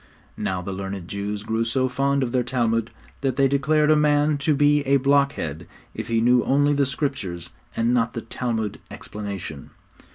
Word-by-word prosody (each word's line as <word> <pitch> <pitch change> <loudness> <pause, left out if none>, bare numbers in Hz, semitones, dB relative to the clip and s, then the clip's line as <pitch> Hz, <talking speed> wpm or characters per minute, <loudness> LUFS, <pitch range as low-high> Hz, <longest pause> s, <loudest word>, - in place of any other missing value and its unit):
Now 90 -1 -2
the 100 - -5
learned 95 -2 -5
Jews 100 +1 -4
grew 110 +1 0
so 130 +3 +1
fond 140 +2 +1
of 120 - -2
their 125 0 +2
Talmud, 115 -2 0 0.3
that 135 -1 0
they 135 -1 +4
declared 150 +3 +2
a - - +6
man 150 0 +3
to 150 +1 +2
be 145 +1 +4
a 140 +1 +5
blockhead 135 - +1 0.3
if - - -5
he 115 -1 +1
knew 125 +1 +4
only 145 +2 +3
the 140 -1 +2
Scriptures 125 - -3 0.2
and 115 +2 +1
not 120 -1 +1
the 115 - -3
Talmud 110 -2 -3
explanation. 100 -8 -7
125 Hz, 175 wpm, -23 LUFS, 105-140 Hz, 0.3 s, a